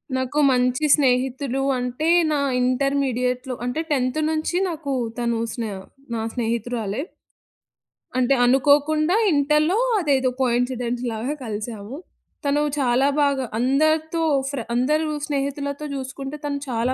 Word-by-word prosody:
నాకు 260 +3 -1
మంచి 250 +3 +2
స్నేహితులు 265 -1 0 0.2
అంటే 250 +6 -2 0.2
నా 295 - +1 0.2
ఇంటర్మీడియట్‌లో 255 -1 0
అంటే 250 +6 -1
10థ్ 255 0 +1
నుంచి 315 +2 -1
నాకు 310 -4 -4 0.3
తను 235 -1 0
స్నే 225 -3 -4 0.4
నా 225 - -2
స్నేహితురాలే. 230 -2 -2 1.2
అంటే 255 +1 +3
అనుకోకుండా 290 +6 +3 0.2
ఇంటర్‌లో 300 +5 +2 0.2
అదేదో 275 -6 +2
కోయిన్సిడెన్స్‌లాగా 245 0 -1
కలిసాము. 215 +1 -5 0.5
తను 285 +1 +2 0.2
చాలా 260 0 +3
బాగా 280 -2 +1
అందరితో 310 +5 +1 0.3
ఫ్ర 280 -2 -4
అందరు 300 +6 +1 0.2
స్నేహితులతో 280 0 -3
జూసుకుంటే 270 +1 -5
తను 285 -1 -1
చాలా 240 +1 0
265 Hz, 105 wpm, -23 LUFS, 245-290 Hz, 1.2 s, అంటే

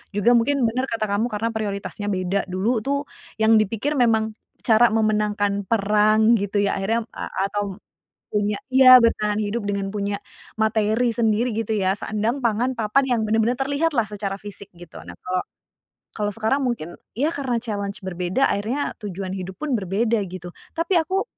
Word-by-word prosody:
Juga 205 +4 +3
mungkin, 250 +3 +3
benar 250 +3 0
kata 225 -1 -1
kamu 210 +4 +1
karena 225 0 -2
prioritasnya 205 -1 -4
beda, 190 0 -1
dulu 195 +6 0
tuh 280 +5 -1 0.3
yang 220 0 +4
dipikir 215 +7 -1
memang 220 -2 +2 0.3
cara 235 +1 +5
memenangkan 210 -2 0
perang 215 +1 +3
gitu 205 +1 0
ya, 200 - 0
akhirnya, 225 +4 0
a - - -6 0.2
atau 205 -2 -2 0.5
punya 205 0 -1
iya, 255 -1 +8
bertahan 215 -3 +1
hidup 215 +2 -2
dengan 200 -1 -2
punya 200 0 -2 0.4
materi 220 +2 +1
sendiri 230 +1 +1
gitu 225 0 -2
ya, 195 -2 +1
sandang, 220 +5 -2
pangan, 235 +3 +1
papan, 230 +4 +2
yang 240 -3 +1
benar-benar 220 +3 +1
terlihatlah 285 -1 +1
secara 200 -1 -4
fisik, 200 -1 -9
gitu. 175 -1 -12
Nah, 85 - -9
kalau 185 0 -1 0.7
kalau 210 -1 -2
sekarang 220 +6 0
mungkin, 175 -9 -4 0.2
ya 290 +8 +1
karena 270 -6 -2
challenge 205 -2 -4
berbeda 185 +7 -1
akhirnya 225 +8 -1
tujuan 195 -3 -5
hidup 190 -1 -6
pun 300 -3 -3
berbeda, 215 +4 0
gitu. 175 -1 -8 0.2
Tapi 335 +3 0
aku 375 +5 0
215 Hz, 160 wpm, -23 LUFS, 200-235 Hz, 0.7 s, iya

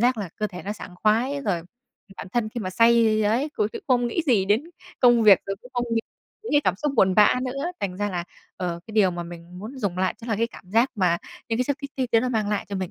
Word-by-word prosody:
giác 245 0 +3
là 195 -4 -3
cơ 215 - -1
thể 180 -4 -9
nó 205 - -3
sảng 195 -4 -10
khoái 245 +7 +2
rồi, 175 - +1
ừm, 165 - -9 0.5
bản - - -7
thân 235 -3 0
khi 235 +2 -5
mà 185 -3 -3
say 230 +1 +4
ấy 230 +8 +1
cũng 215 -8 -1 0.2
không 245 -2 +3
nghĩ 285 +8 -1
gì 225 -8 +3
đến 210 +7 +2 0.4
công 240 -2 +6
việc 205 -4 +8
rồi 195 0 -3
cũng 250 - -14
không 245 0 0
nghĩ 225 - +2 0.4
những 445 - -5
cái 290 - +5
cảm 185 - +2
xúc 295 +7 -1
buồn 190 -3 +4
bã 210 +1 +6
nữa. 275 +3 -3 0.2
Thành 185 -2 -3
ra 205 0 -1
là, 175 -2 -3 0.3
ờ, 175 -2 -3
cái 220 - -10
điều 210 -4 +4
mà 175 -1 -4
mình 170 +1 -10
muốn 235 +7 -8
dùng 195 -6 -2
lại 185 0 +1
chắc 235 0 -10
là 220 - 0
cái 230 +1 +1
cảm 185 -5 -15
giác 230 +6 +3
mà 180 -5 +2 0.3
những 225 0 -1
cái 250 - +2
chất 285 +1 -1 0.2
thích 255 -2 -1
đấy 225 - +5
nó 255 - -1
mang 220 -4 0
lại 210 -1 -1
cho 200 - -3
mình 185 -2 -3
215 Hz, 280 wpm, -24 LUFS, 190-240 Hz, 0.5 s, việc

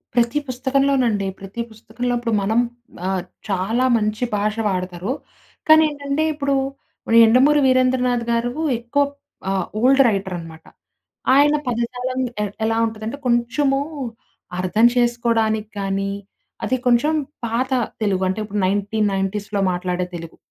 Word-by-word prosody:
ప్రతి 240 +4 +2
పుస్తకంలోనండి. 255 -5 +1
ప్రతి 195 +4 -6
పుస్తకంలో 230 +3 -4
ఇప్పుడు 235 -2 -2
మనం 220 +4 +2 0.5
ఆహ్, 190 -2 -1 0.3
చాలా 210 +7 +1
మంచి 215 +2 -1
భాష 210 +1 0
వాడతారు. 185 +3 -3 0.6
కానీ, 315 0 +8
ఏంటంటే 285 +1 -2
ఇప్పుడు 280 -1 -1 0.7
'యండమూరి 260 +6 +5
వీరేంద్రనాథ్‌గారు' 245 -2 +1 0.3
ఎక్కువ 245 +5 +1 0.5
ఆహ్, 195 -1 0 0.2
ఓల్డ్ 270 +3 +5
రైటరనమాట. 175 -5 -4 0.7
ఆయన 290 +1 +5
పదజాలం 250 +2 -2 0.2
ఎ - - 0 0.2
ఎలా 225 0 +1
ఉంటుందంటే 220 +3 -5
కొంచెము 250 +4 +2 0.8
అర్థం 185 +6 +3
చేసుకోడానికి 230 -3 +1
కానీ, 195 0 -1 0.5
అది 260 - +1
కొంచెం 270 +6 +3 0.3
పాత 245 +4 -1 0.3
తెలుగు 190 -2 +1
అంటే 190 - -2
ఇప్పుడు 205 -1 -2
1990స్‌లో 205 0 -1
మాట్లాడే 180 0 -2
తెలుగు. 165 -1 -8
230 Hz, 110 wpm, -21 LUFS, 195-255 Hz, 0.8 s, కానీ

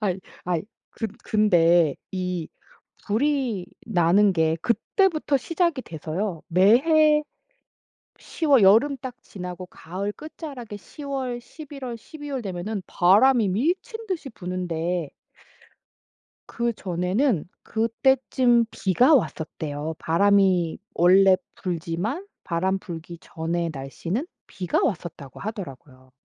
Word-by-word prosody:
아이, 190 -4 0 0.3
아이 175 -2 0 0.3
근 225 - -4 0.2
근데 175 -7 +4 0.2
이 180 -3 -3 0.6
불이 240 -4 0 0.2
나는 195 0 +4
게 160 -2 +2
그때부터 310 - +2
시작이 335 0 0
돼서요. 165 +2 -4
매해 300 - +5 1.0
10 330 - -5
월 270 -7 +6
여름 230 +9 +5
딱 255 -1 -7
지나고 180 -1 -8
가을 185 +4 -5
끝자락에 275 -6 -8
10 290 +8 -12
월, 265 -3 -3
11 285 0 -10
월, 235 -1 -5
12 290 +5 -10
월 265 -2 -2
되면은 195 +1 -4
바람이 215 +6 +4
미친 375 - -1
듯이 345 -8 -3
부는데 175 -4 -3 1.4
그전에는 200 - 0 0.2
그때쯤 240 +1 +2
비가 240 - +3
왔었대요. 155 - -2
바람이 185 -1 +3 0.2
원래 185 +2 +6 0.2
불지만 180 - -3 0.2
바람 185 +3 0
불기 170 -2 -8
전에 165 +1 -3
날씨는 165 - -4 0.2
비가 180 -3 -1
왔었다고 160 - -4
하더라고요. 135 - -8
195 Hz, 215 characters per minute, -24 LUFS, 175-260 Hz, 1.4 s, 월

